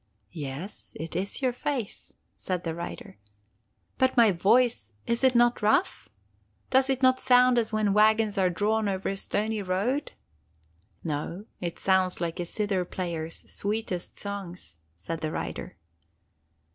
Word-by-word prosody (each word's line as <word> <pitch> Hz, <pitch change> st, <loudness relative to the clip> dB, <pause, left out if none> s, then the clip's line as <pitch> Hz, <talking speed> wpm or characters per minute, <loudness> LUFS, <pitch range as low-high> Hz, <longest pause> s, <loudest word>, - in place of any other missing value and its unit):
'Yes, 150 Hz, +4 st, -7 dB
it 165 Hz, +1 st, -6 dB
is 195 Hz, +9 st, -2 dB
your 255 Hz, -1 st, +2 dB
face,' 250 Hz, -4 st, -4 dB, 0.2 s
said 180 Hz, -2 st, -3 dB
the 165 Hz, -, -2 dB
rider. 170 Hz, -10 st, -7 dB, 0.8 s
'But 260 Hz, 0 st, +2 dB
my 230 Hz, -3 st, +7 dB
voice, 195 Hz, -, +2 dB
is 235 Hz, +2 st, 0 dB
it 260 Hz, -1 st, +5 dB
not 240 Hz, 0 st, +4 dB
rough? 220 Hz, -, +1 dB, 0.6 s
Does 265 Hz, +1 st, +4 dB
it 265 Hz, 0 st, 0 dB
not 255 Hz, 0 st, +5 dB
sound 250 Hz, -1 st, +5 dB
as 230 Hz, -, -1 dB
when 215 Hz, -2 st, +1 dB
wagons 215 Hz, 0 st, +4 dB
are 185 Hz, -1 st, +4 dB
drawn 210 Hz, +4 st, +1 dB
over 190 Hz, -1 st, -2 dB
a 195 Hz, -, -2 dB
stony 210 Hz, +2 st, -1 dB
road?' 200 Hz, +10 st, -1 dB, 0.9 s
'No! 165 Hz, +5 st, -4 dB
It 170 Hz, -2 st, -4 dB
sounds 190 Hz, -1 st, +2 dB
like 170 Hz, +1 st, -3 dB
a 175 Hz, -, -1 dB
zither 200 Hz, 0 st, -1 dB
player's 170 Hz, -3 st, -5 dB
sweetest 205 Hz, -3 st, -3 dB
songs,' 185 Hz, -, -6 dB, 0.2 s
said 100 Hz, -, -5 dB
the 155 Hz, 0 st, -2 dB
rider. -, -, -5 dB
200 Hz, 145 wpm, -27 LUFS, 175-235 Hz, 0.9 s, my